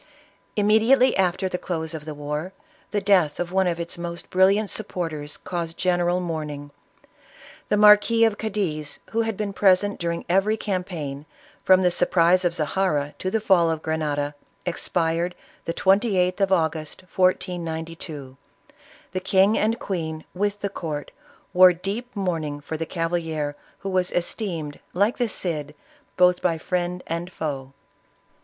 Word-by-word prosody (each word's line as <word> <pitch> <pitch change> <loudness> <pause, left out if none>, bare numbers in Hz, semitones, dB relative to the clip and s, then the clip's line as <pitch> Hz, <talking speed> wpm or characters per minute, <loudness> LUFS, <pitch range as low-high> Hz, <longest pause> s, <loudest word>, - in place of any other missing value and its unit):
Immediately 220 +5 +4
after 190 0 +1
the 180 -1 -3
close 160 -2 -3
"of 155 -2 -7
the 155 -1 -6
war, 150 +5 -4 0.4
the 210 - 0
death 185 -7 +3
of 175 0 -2
one 190 0 +2
of 170 -1 -1
its 170 0 -5
most 170 0 -6
brilliant 195 +3 +3
supporters 160 -8 -3
caused 170 -2 -5
general 175 -1 +1
mourning. 150 -4 -4 1.0
The 210 - +3
Marquis 210 +2 +6
of 220 -2 0
Cadiz, 180 -9 -3
who 230 - +1
had 225 -3 -2
been 205 -2 -3
pres 190 -1 +5
ent 205 0 -3
during 170 0 -2
every 195 +5 +2
campaign, 170 -8 -4 0.4
from 185 0 +5
the 180 - +4
surprise 180 +1 +3
of 175 -1 +1
Zahara 150 -3 0
to 185 - -2
the 220 - +1
fall 185 -5 +4
of 160 -1 -2
Grenada, 150 -2 -1 0.3
expired 170 0 -1 0.3
the 165 - -2
28th 190 -2 +2
of 195 -1 +2
August, 160 -3 0
1492. 165 -6 -2 0.7
The 185 - -2
king 195 +3 +3
and 225 +2 +1
queen, 160 -7 -4
with 205 +2 -1
the 200 - -1
court, 155 -6 -5 0.4
wore 180 0 +8
deep 205 +8 -5
mourning 165 -7 -2
for 150 +2 -6
the 160 +1 -3
cavalier, 165 -4 -2 0.2
who 195 - -5
was 185 -1 +2
esteemed, 170 -5 -3 0.2
like 205 +7 +2
the 240 -2 +1
Cid, 150 -6 -3 0.4
both 180 -1 +4
by 170 -2 +1
friend 180 +1 -2
and 170 +2 -4
foe. 135 -5 -4
180 Hz, 150 wpm, -24 LUFS, 160-195 Hz, 1.0 s, wore